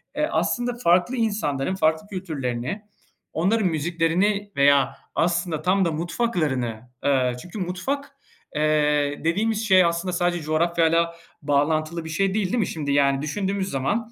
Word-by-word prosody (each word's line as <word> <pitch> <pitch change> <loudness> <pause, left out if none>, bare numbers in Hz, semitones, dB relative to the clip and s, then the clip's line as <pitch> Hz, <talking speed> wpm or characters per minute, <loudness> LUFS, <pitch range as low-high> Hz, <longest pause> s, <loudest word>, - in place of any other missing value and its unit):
eee, 300 +2 0
aslında 245 0 0
farklı 180 +8 +3
insanların 190 - -1
farklı 160 +2 +1
kültürlerini, 150 - -4 0.5
onların 195 +5 +2
müziklerini 175 +5 0
veya 140 -1 +4 0.2
aslında 170 -2 0
tam 190 +2 +2
da 170 - +1
mutfaklarını, 155 - -1 0.2
eee, 130 -3 +2
çünkü 180 +4 -8
mutfak, 265 +11 -3 0.4
eee, 150 -1 +1
dediğimiz 215 +6 0
şey 185 -2 +6
aslında 170 +2 -1
sadece 175 -1 0
coğrafyayla 165 +1 +2 0.3
bağlantılı 155 +3 0
bir 160 - -6
şey 190 +4 0
değil, 210 -2 0
değil 215 +7 -1
mi? 195 - +1
Şimdi, 150 -3 -3
yani, 140 -1 +3
düşündüğümüz 195 +5 -2
zaman 215 - -1
170 Hz, 135 wpm, -24 LUFS, 150-195 Hz, 0.5 s, şey